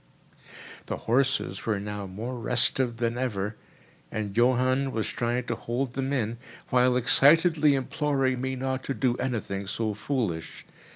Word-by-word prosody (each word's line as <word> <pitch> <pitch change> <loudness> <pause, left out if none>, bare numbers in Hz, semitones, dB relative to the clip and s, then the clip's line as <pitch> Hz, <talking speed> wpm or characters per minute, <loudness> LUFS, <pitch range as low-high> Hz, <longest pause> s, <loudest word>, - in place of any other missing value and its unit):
The - - -3
horses 130 -5 0
were 105 -3 +1
now 105 0 -5
more 110 +7 -5
restive 120 +1 +1
than 120 +1 -1
ever, 105 -4 -2 0.6
and 105 -2 -4
Johann 130 +3 +2
was 110 -3 -2
trying 120 +1 -1
to 120 - -3
hold 120 +2 -3
them 135 +1 -2
in, 120 -4 -1 0.3
while 125 0 +4
excitedly 150 +4 +5
imploring 135 -2 0
me 130 0 -2
not 130 0 -3
to 135 - -2
do 125 -3 +1
anything 100 -6 -3
so 110 +2 -2
foolish. 105 - -3
125 Hz, 140 wpm, -27 LUFS, 110-130 Hz, 0.6 s, excitedly